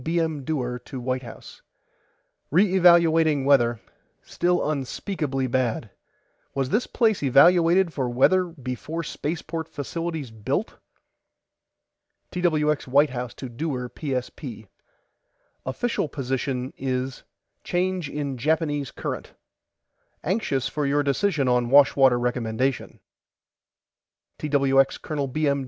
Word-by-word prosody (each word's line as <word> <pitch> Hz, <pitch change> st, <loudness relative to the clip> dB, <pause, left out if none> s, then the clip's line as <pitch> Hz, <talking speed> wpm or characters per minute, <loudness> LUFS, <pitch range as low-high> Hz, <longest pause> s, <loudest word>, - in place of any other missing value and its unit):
B. 170 Hz, +4 st, 0 dB
M. 160 Hz, -4 st, -1 dB
DEWAR 125 Hz, -4 st, -2 dB
TO 130 Hz, -, -8 dB
WHITE 130 Hz, +1 st, -2 dB
HOUSE: 120 Hz, -3 st, -12 dB, 0.9 s
RE 185 Hz, +4 st, +3 dB
EVALUATING 165 Hz, -5 st, +5 dB
WEATHER 120 Hz, -5 st, +4 dB, 0.4 s
STILL 175 Hz, -1 st, 0 dB
UNSPEAKABLY 140 Hz, -1 st, -2 dB
BAD 120 Hz, -4 st, -1 dB, 0.6 s
WAS 135 Hz, 0 st, -1 dB
THIS 225 Hz, +4 st, +1 dB
PLACE 220 Hz, -4 st, +1 dB
EVALUATED 170 Hz, +5 st, +5 dB
FOR 130 Hz, -3 st, -1 dB
WEATHER 180 Hz, +10 st, +3 dB
BEFORE 155 Hz, +1 st, -5 dB
SPACEPORT 160 Hz, +1 st, -4 dB
FACILITIES 160 Hz, -2 st, -4 dB
BUILT 130 Hz, -, -3 dB, 1.5 s
TWX 155 Hz, -5 st, +1 dB
WHITE 145 Hz, +3 st, +4 dB
HOUSE 125 Hz, -1 st, -5 dB
TO 130 Hz, -, -7 dB
DEWAR 125 Hz, 0 st, -4 dB
PSP: 125 Hz, -5 st, -5 dB, 1.0 s
OFFICIAL 160 Hz, -, -1 dB
POSITION 130 Hz, -1 st, -3 dB
IS 130 Hz, 0 st, -3 dB, 0.4 s
CHANGE 180 Hz, -3 st, -1 dB
IN 140 Hz, -3 st, -4 dB
JAPANESE 150 Hz, -1 st, 0 dB
CURRENT -, -, -5 dB, 0.9 s
ANXIOUS 155 Hz, -, 0 dB
FOR 145 Hz, +1 st, -2 dB
YOUR 145 Hz, +1 st, +2 dB
DECISION 145 Hz, 0 st, +1 dB
ON 125 Hz, -1 st, +2 dB
WASHWATER 135 Hz, -2 st, +6 dB
RECOMMENDATION 120 Hz, +1 st, -2 dB, 1.4 s
TWX 135 Hz, -2 st, +2 dB
COL. 145 Hz, -3 st, -3 dB
B. 150 Hz, +4 st, -1 dB
M. 140 Hz, 0 st, +2 dB
140 Hz, 110 wpm, -24 LUFS, 130-165 Hz, 1.5 s, WASHWATER